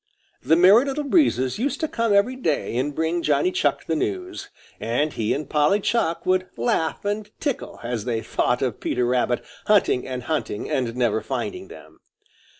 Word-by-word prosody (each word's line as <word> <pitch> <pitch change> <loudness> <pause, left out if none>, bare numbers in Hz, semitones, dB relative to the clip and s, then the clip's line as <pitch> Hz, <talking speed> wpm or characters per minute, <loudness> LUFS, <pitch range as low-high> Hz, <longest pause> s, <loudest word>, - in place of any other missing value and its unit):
The 160 - +3
Merry 195 +9 +6
Little 280 +2 -2
Breezes 240 - +2
used 275 +4 -1
to 315 - +1
come 230 -5 -1
every 200 +6 +3
day 160 - -1
and 140 +4 -1
bring 160 +2 0
Johnny 150 +3 +2
Chuck 145 -5 0
the 160 - -1
news, 365 - -3 0.3
and 130 +7 -1
he 110 -1 -1
and 150 +2 -2
Polly 150 +7 +2
Chuck 195 -6 0
would 185 0 +1
laugh 160 +10 -1
and 205 +1 -2
tickle, 285 -5 -3
as 120 -2 -3
they 115 -3 -1
thought 125 +1 0
of 125 -5 -2
Peter 125 0 0
Rabbit 125 0 0 0.2
hunting 200 -11 +3
and 130 -1 -5
hunting 120 -7 -3
and 120 -3 -1
never 120 -3 +1
finding 370 0 -4
them. - - -14
160 Hz, 175 wpm, -23 LUFS, 125-210 Hz, 0.3 s, Merry